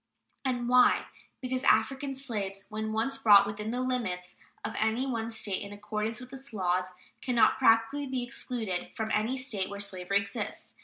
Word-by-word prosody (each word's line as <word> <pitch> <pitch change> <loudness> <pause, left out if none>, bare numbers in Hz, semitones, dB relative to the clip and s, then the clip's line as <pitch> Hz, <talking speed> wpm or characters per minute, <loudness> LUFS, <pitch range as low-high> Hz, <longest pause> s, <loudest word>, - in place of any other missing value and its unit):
And 245 -3 -1
why? 250 0 +5 0.4
Because 255 0 -2
African 270 0 +2
slaves, 205 -7 -4
when 215 0 -3
once 225 +5 0
brought 205 -2 +8
within 210 +1 -4
the 250 +2 -1
limits 195 -9 -2 0.3
of - - -3
any 220 +4 +1
one 230 -4 -2
State 210 -4 -1
in 200 - -6
accordance 215 +2 -3
with 250 +1 -11
its 270 -2 -10
laws, 185 -2 +1 0.4
can 250 -2 -1
not 230 +2 +4
practically 255 +4 +3
be 260 -2 -2
excluded 230 -6 -3
from 220 -1 -2
any 220 +5 +1
State 235 -8 -1
where 200 0 -6
slavery 200 -1 0
exists. 200 0 -4
225 Hz, 170 wpm, -29 LUFS, 200-255 Hz, 0.4 s, brought